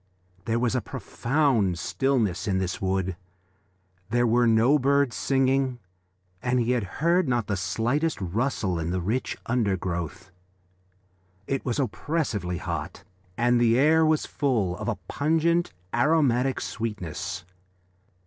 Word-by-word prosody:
There 115 0 0
was 120 -1 +1
a 125 - +1
profound 120 - 0
stillness 110 -3 0
in 95 -2 +1
this 95 -1 -2
wood; 95 -1 -1 0.9
there 120 +2 +2
were 120 +1 +3
no 115 +6 +4
birds 140 -1 +2
singing 135 -1 +1 0.6
and 125 +1 +1
he 120 0 +1
heard 155 - +1
not 120 -3 +1
the 100 - -1
slightest 120 - -1
rustle 95 -1 -1
in 80 0 -2
the 90 +1 -1
rich 110 +9 -2
undergrowth. 95 - -2 1.1
It 135 +4 -2
was 125 0 -2
oppressively 120 - -2
hot 85 +2 -5 0.3
and 120 0 +3
the 115 0 +4
air 155 +4 +5
was 155 -1 +2
full 115 -11 0
of 105 - -5
a 120 - 0
pungent, 165 +3 +1 0.2
aromatic 135 -1 +2
sweetness. 90 -5 -4
120 Hz, 125 wpm, -26 LUFS, 95-135 Hz, 1.1 s, air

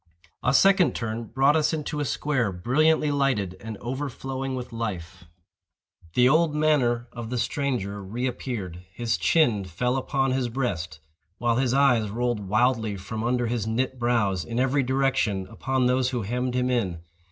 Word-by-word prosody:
A 125 - +3
second 195 +5 +4
turn 115 0 -3
brought 135 +6 +3
us 155 0 +2
into 150 -1 -3
a 145 - 0
square, 130 -4 0
brilliantly 150 - +2
lighted, 130 -10 0
and 110 0 -6
overflowing 135 +1 -4
with 125 -2 -6
life. 95 -6 -5 0.9
The 125 0 +5
old 155 +2 +3
manner 130 -6 +2
of 120 -2 -7
the 125 - -2
stranger 120 -5 -2
re 115 +7 -3
appeared. 110 -9 -4
His 115 +4 -1
chin 120 -12 +2
fell 125 +8 -1
upon 135 0 0
his 130 -2 0
breast, 90 - -3 0.4
while 120 +1 +1
his 130 -1 +1
eyes 125 -6 +3
rolled 120 +1 -1
wildly 110 -1 +1
from 110 +4 -5
under 120 +1 +1
his 115 -2 -2
knit 130 +3 -1
brows, 110 -7 +1
in 115 +1 -3
every 135 +2 +2
direction, 130 -7 0
upon 130 -1 0
those 125 0 +2
who 125 -4 -2
hemmed 125 +4 -2
him 125 0 +1
in. 95 -9 -1
125 Hz, 165 wpm, -25 LUFS, 110-135 Hz, 0.9 s, The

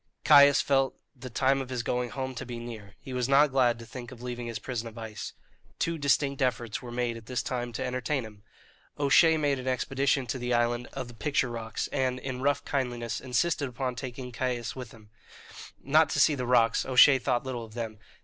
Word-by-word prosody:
Caius 145 -1 +7
felt 135 -1 +1 0.2
the 130 0 -9
time 135 +3 +2
of 130 - -7
his 125 -2 -3
going 125 0 -1
home 130 +1 -4
to 125 - -6
be 120 -1 -6
near; 110 -4 -9
he 130 -2 -9
was 125 0 -1
not 140 +1 +5
glad 125 -3 +3
to 115 - -10
think 125 +2 -9
of 125 - -11
leaving 120 -1 -5
his 115 - -4
prison 120 -3 -4
of 115 0 -11
ice. 110 -2 -6 0.4
Two 165 -1 -1
distinct 140 0 +1
efforts 120 -3 -1
were 125 - -8
made 120 -1 -2
at 110 - -13
this 125 -1 -2
time 120 -1 -3
to 130 - -3
entertain 130 +2 -1
him. 105 -2 -12 0.6
O'Shea 160 +3 +5
made 145 -3 +1
an 130 - -7
expedition 135 +1 +1
to 125 +3 -3
the 125 0 0
island 120 +1 0
of 130 -2 -5
the 120 - -11
picture 125 +1 0
rocks, 115 -2 -4
and, 130 -2 0
in 130 -1 -5
rough 145 +1 +1
kindliness, 120 -4 -2
insisted 140 +2 0
upon 125 +1 -3
taking 125 0 -6
Caius 120 -1 -3
with 125 -3 -7
him, 110 -2 -17 0.7
not 155 +4 +4
to - - -1
see 155 - +5
the 125 -3 -3
rocks 120 -2 +3
O'Shea 130 +1 +6
thought 125 -1 0
little 125 -3 -4
of 110 0 -12
them. 110 -3 -5
125 Hz, 215 wpm, -28 LUFS, 120-135 Hz, 0.7 s, Caius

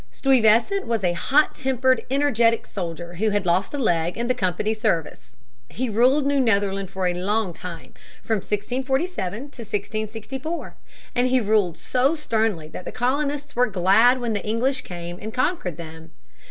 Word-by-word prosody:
Stuyvesant 260 - +3
was 230 -3 -1
a 175 -1 +2
hot 280 - +2
tempered, 260 0 +1
energetic 240 -5 +2
soldier 175 -2 -6
who 215 +5 0
had 205 -2 0
lost 180 +3 +1
a 290 - -3
leg 175 -9 0
in 235 - -1
the 255 - +3
Company's 215 0 -1
service. - - -2 0.3
He 250 -1 -3
ruled 255 +6 +3
New 280 0 +2
Netherland 200 -5 +1
for 190 -1 -3
a 180 - +2
long 195 +1 -1
time, 175 0 -9 0.3
from 220 - 0
1647 250 - -2
to 245 - -7 0.2
1664. 220 - -4 0.4
And 245 +1 +2
he 255 0 +3
ruled 205 -6 +1
so 260 - +1
sternly 220 - -1
that 180 - -8
the - - -5
colonists 285 +4 -1
were 250 +1 +3
glad 215 +7 +4
when 240 -2 -2
the 205 - -2
English 250 +5 0
came 175 -3 -7
and 215 +1 -5
conquered 255 - -1
them. 160 -1 -10
220 Hz, 165 wpm, -23 LUFS, 185-255 Hz, 0.4 s, glad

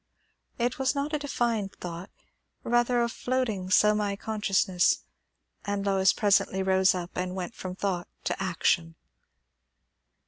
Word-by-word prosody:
It 240 +2 -1
was 265 +2 +1
not 285 +2 -2
a 300 - +1
defined 235 -8 -1
thought; 175 +1 -7 0.5
rather 240 0 +2
a - - +1
floating 235 -6 -2
semi 210 +1 +3
consciousness; 195 -4 +1 0.6
and 200 -1 -2
Lois 190 -1 +4
presently 195 -2 +2
rose 190 0 +3
up 175 -1 -5
and 180 0 -3
went 185 +3 -4
from 185 -4 -6
thought 185 -3 -2 0.2
to - - -2
action. 170 -2 0
200 Hz, 130 wpm, -27 LUFS, 185-235 Hz, 0.6 s, Lois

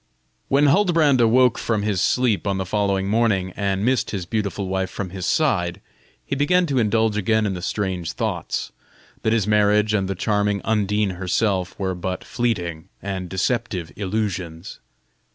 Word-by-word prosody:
When 140 +2 +3
Huldbrand 155 -5 +4
awoke 120 +1 +4
from 110 -3 -1
his 100 -4 0
sleep 120 -5 +1
on 100 -1 0
the 95 - -2
following 100 0 0
morning, 100 -4 +1
and 100 +1 -1
missed 130 0 +1
his 95 -4 -4
beautiful 100 0 -2
wife 95 0 -1
from 95 -2 -5
his 95 -1 -4
side, 90 - +1 0.5
he - - -2
began 180 +6 +3
to 140 -5 0
indulge 110 -1 +2
again 110 +2 +2
in 100 - -1
the 90 - -5
strange 95 -3 -2
thoughts, - - -3 0.5
that 110 - +1
his 110 -4 +2
marriage 105 0 +3
and 100 -3 +1
the 95 - -2
charming 105 +1 0
Undine 105 -3 0
herself 95 0 0
were 95 -2 -1
but 90 +1 -4
fleeting 90 -10 -2
and 95 0 -5
deceptive 95 -3 -2
illusions. 95 -5 -4
105 Hz, 160 wpm, -22 LUFS, 95-115 Hz, 0.5 s, Huldbrand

